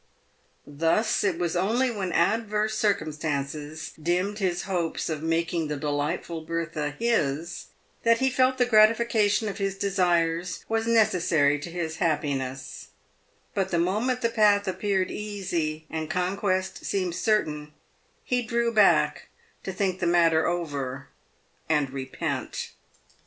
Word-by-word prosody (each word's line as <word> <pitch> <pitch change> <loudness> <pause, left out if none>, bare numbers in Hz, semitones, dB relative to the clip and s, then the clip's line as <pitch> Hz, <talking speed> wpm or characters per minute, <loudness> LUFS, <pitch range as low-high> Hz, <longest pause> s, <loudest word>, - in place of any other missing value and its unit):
Thus 165 +11 +1
it 190 -5 +1
was 175 -1 -1
only 230 +8 +1
when 195 -5 -3
adverse 215 +4 +1
circumstances 155 -5 -2
dimmed 180 +6 0
his 180 -3 0
hopes 175 -5 -2
of 155 -2 -3
making 165 0 0
the 150 -1 -3
delightful 150 +3 -2
Bertha 160 -3 -3
his, 170 -9 -1 0.3
that 230 0 +4
he 265 +2 +1
felt 255 +1 +2
the 250 - +3
gratification 220 -1 +4
of 200 -1 -5
his 195 -1 -1
desires 175 -3 0
was 225 0 0
necessary 170 -10 +3
to 150 - -7
his 165 -2 -4
happiness, 140 -6 -2 0.7
but 195 -2 0
the 170 - 0
moment 215 +9 0
the 235 - +2
path 210 -3 +3
appeared 190 0 0
easy, 175 -7 -3
and 160 0 -4
conquest 190 +1 -1
seemed 185 -3 -1
certain, 155 -8 0 0.5
he 250 -1 0
drew 235 0 0
back 210 -3 +3 0.3
to 190 - -5
think 185 -1 -1
the 175 - 0
matter 165 -2 +4
over 140 -6 -3 0.6
and 150 -4 +1
repent. 130 -1 -4
175 Hz, 130 wpm, -26 LUFS, 155-210 Hz, 0.7 s, that